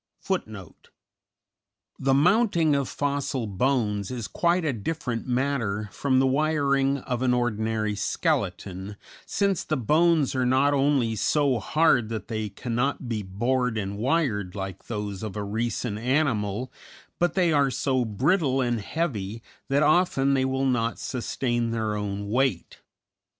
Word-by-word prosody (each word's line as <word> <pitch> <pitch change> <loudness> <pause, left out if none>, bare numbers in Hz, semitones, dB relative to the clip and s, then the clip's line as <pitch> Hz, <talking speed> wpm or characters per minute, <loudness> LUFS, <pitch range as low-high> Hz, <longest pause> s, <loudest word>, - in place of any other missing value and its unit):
_The 135 0 +3
mounting 170 - +3
of 140 -2 -1
fossil 140 -3 -2
bones 105 -1 0
is 120 -4 -4
quite 175 0 +1
a 145 - +1
different 125 0 -3
matter 120 -6 -1
from 135 -2 0
the 135 - +4
wiring 140 -1 +2
of 125 -2 -4
an 125 -1 +3
ordinary 110 -2 0
skeleton, 100 0 -2 0.3
since 200 -3 0
the 155 - -1
bones 155 +4 +3
are 130 -1 0
not 130 +3 +3
only 135 -5 +2
so 135 +4 +2
hard 130 -5 +2
that 110 -1 -5
they 110 -2 -2
cannot 120 +6 -2
be 115 -3 -2
bored 120 +5 -1
and 100 -1 -3
wired 110 - 0
like 95 -1 -6
those 105 -4 -4
of 110 -2 -5
a 105 - -3
recent 110 +1 -2
animal, 125 -3 0 0.5
but 175 0 +1
they 175 -4 +3
are 140 -2 +3
so 130 -1 0
brittle 135 - +1
and 120 -3 0
heavy 115 - -3 0.3
that 140 +2 +3
often 150 -4 +3
they 130 -1 +2
will 130 +1 0
not 120 -3 0
sustain 120 -1 -2
their 110 -2 -1
own 100 -1 -3
weight. 130 +4 0
125 Hz, 140 wpm, -26 LUFS, 110-140 Hz, 0.5 s, the